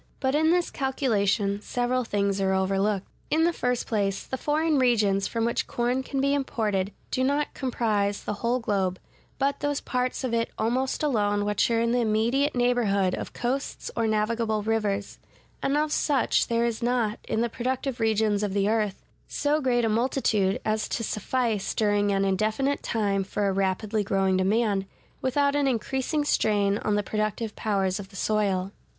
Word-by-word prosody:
But 265 0 0
in 315 +2 +3
this 350 +1 +2
calculation 205 -7 0
several 245 +3 -1
things 200 -3 0
are 190 0 +2
overlooked. 195 +1 0 0.2
In 320 +1 +2
the 340 +1 +3
first 250 -4 -1
place, 200 -3 -1
the - - -4
foreign 300 +2 +1
regions 210 -6 +2
from 230 -1 -1
which 235 - -1
corn 245 +2 0
can 270 +1 -4
be 280 +1 +2
imported 210 -8 -1 0.2
do 255 - 0
not 285 +2 0
comprise 210 -6 -1
the - - -2
whole 240 +2 +1
globe, 195 -6 -1 0.4
but 280 +1 0
those 290 -1 -1
parts 250 +1 -2
of 250 -3 -2
it 230 0 +1
almost 255 +6 0
alone 205 -7 +1
which 210 +2 +1
are 230 -1 +2
in 230 0 +1
the 245 - +2
immediate 235 +6 +1
neighborhood 225 -7 +2
of - - -5
coasts 260 +3 -3
or 230 -1 +1
navigable 215 0 0
rivers; 210 -2 -1 0.4
and 280 +2 +1
of 305 0 0
such 280 -5 +2
there 235 0 +1
is 235 -2 -2
not, 235 -3 0
in 220 - 0
the 235 - +2
productive 255 +2 -3
regions 220 -2 +2
of 205 -2 -2
the 200 0 +2
earth, 210 -3 -1 0.2
so 295 +1 0
great 245 -3 +2
a - - +2
multitude 220 -4 +1
as 215 0 0
to 230 - -2
suffice 220 -1 -1
during 205 -1 +2
an 195 0 +1
indefinite 215 +9 0
time 200 -3 0
for 200 +1 -1
a 195 - +1
rapidly 195 +3 0
growing 195 -1 +1
demand, 195 +1 +1 0.3
without 280 +2 +1
an 290 -1 +2
increasing 265 +4 -1
strain 205 -6 +2
on 210 - 0
the 205 - +1
productive 215 +1 -2
powers 195 -3 0
of 195 -1 -8
the 195 - -16
soil. 195 -2 0
225 Hz, 175 wpm, -26 LUFS, 205-255 Hz, 0.4 s, in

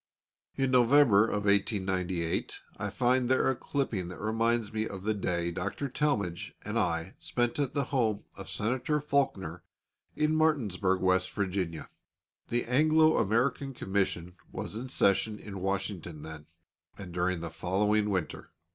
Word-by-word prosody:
In 135 -1 +1
November 125 -4 +6
of 105 -1 -2
1898 95 -4 0 0.2
I 105 0 -3
find 125 +3 +2
there 130 0 +3
a - - -2
clipping 120 -10 -2
that 90 - -8
reminds 115 0 0
me 110 0 -1
of 95 -1 -7
the 110 +1 +1
day 85 -4 -1
Dr. 140 +10 -3
Talmage 105 - -1
and 105 +2 -1
I 85 -2 -1
spent 120 +2 -1
at 140 -2 -1
the 140 - +2
home 115 -6 0
of - - -9
Senator 130 +7 0
Faulkner, 130 - -1 0.5
in 155 +1 +2
Martinsburg, 105 - +1
West 95 0 +2
Virginia. 95 -5 -2 0.6
The 120 0 -1
Anglo 155 +5 +4
American 125 +5 +1
Commission 95 -4 -2
was - - -5
in 120 +4 -5
session 105 0 +2
in 100 -3 -8
Washington 95 -5 -3
then, 80 -1 -9 0.5
and 95 -3 -8
during 90 0 0
the 85 -1 -5
following 105 +5 +1
winter. 95 -5 -3
105 Hz, 145 wpm, -30 LUFS, 95-125 Hz, 0.6 s, November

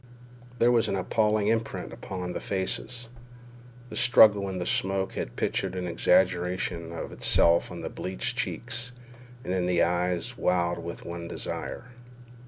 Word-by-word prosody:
There 120 +1 +4
was 115 -2 +3
an - - 0
appalling 105 +2 +1
imprint 115 +1 -1
upon 90 -2 -5
these - - -4
faces. 110 +5 -2 0.8
The - - -6
struggle 105 -4 +6
in 95 - -4
the 90 - -3
smoke 95 +1 0
had - - -4
pictured - - -1
an 90 -1 -3
exaggeration 90 -1 +1
of 85 - -6
itself 85 0 +3
on - - -7
the - - -4
bleached 95 +7 -3
cheeks 120 0 -3 0.5
and 90 - -2
in 90 -1 0
the 90 -1 +3
eyes 90 +7 0
wild 85 -1 +1
with 85 0 -7
one 85 0 -6
desire. 125 +7 -5
95 Hz, 150 wpm, -27 LUFS, 90-110 Hz, 0.8 s, struggle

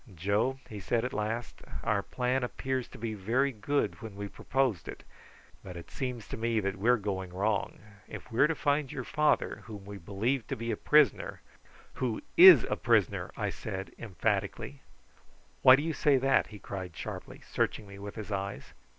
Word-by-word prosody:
"Joe," 100 +9 0
he 105 - -7
said 115 +5 0
at 130 - -4
last, 110 +3 -3 0.2
"our 105 -3 +1
plan 125 +4 -1
appeared 130 +1 -2
to - - -13
be 115 0 -3
very 120 +8 +1
good 135 +6 -1
when 110 -3 -8
we 100 0 -5
proposed 130 -3 -1
it, - - -8 0.6
but 90 -2 -8
it 85 - -11
seems 125 -5 -4
to - - -5
me 115 0 +1
that 100 -1 -2
we 110 +5 +2
are 125 - +6
going 95 -3 -4
wrong. 100 +2 -1 0.3
If - - -9
we 115 - -3
are 150 - +7
to 165 - -1
find 145 -2 0
your 130 - -4
father, 150 +4 +1
whom 105 -3 -9
we 100 0 -8
believe 110 +8 -1
to - - -2
be 115 +1 -3
a - - 0
prisoner 150 -7 +3 0.3
" - - -25
"Who 120 -4 -1
is 180 -9 +10
a - - -1
prisoner!" - - +2
I - - -1
said 95 +1 -6
emphatically. 110 +4 -2 0.8
"Why 130 - +9
do 145 - -2
you 165 0 -1
say 145 -3 +3
that?" 135 +1 +3
he 105 - -10
cried 95 -3 -7
sharply, - - -7
searching 105 - -2
me 100 0 -11
with 100 0 -7
his 105 -1 -7
eyes. 100 0 -4
110 Hz, 195 wpm, -30 LUFS, 100-130 Hz, 0.8 s, is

